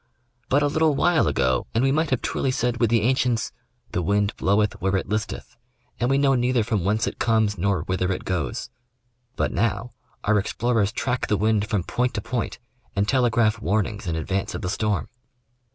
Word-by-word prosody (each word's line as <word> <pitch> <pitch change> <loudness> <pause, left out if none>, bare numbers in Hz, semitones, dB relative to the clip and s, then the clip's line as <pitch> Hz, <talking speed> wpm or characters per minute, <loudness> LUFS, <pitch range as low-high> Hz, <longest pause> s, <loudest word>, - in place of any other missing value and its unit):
But 145 +2 +3
a - - +3
little 155 0 +2
while 175 +2 +3
ago 65 0 +1
and 115 - +3
we 135 - +3
might 155 +2 +1
have 130 - 0
truly 135 - -1
said 125 -2 0
with 115 -2 +2
the 115 -2 +2
ancients 125 -1 +1 0.2
" - - -37
the - - -1
wind 100 +3 +1
bloweth 105 +2 +1
where 95 +1 +1
it 95 - -1
listeth, 110 +2 -4 0.4
and 120 - +1
we 135 - +3
know 140 -1 +3
neither 125 -2 +2
from 105 -4 -1
whence 110 +4 +1
it - - -5
comes 110 -3 +2
nor 95 -3 0
whither 95 0 -1
it 95 - -4
goes"; 80 -9 -3 0.6
but - - 0
now 115 +1 -1 0.3
our 105 0 +3
explorers 110 0 0
track 125 0 -1
the 105 - +1
wind 105 +1 +1
from 105 -6 0
point 125 +6 -1
to 105 - -1
point 120 +3 -3 0.4
and 100 +1 +1
telegraph 120 -4 +2
warnings 105 +1 -1
in 80 - -1
advance 95 +5 -2
of - - -5
the 90 - -1
storm. 105 +1 -1
110 Hz, 200 wpm, -24 LUFS, 100-125 Hz, 0.6 s, But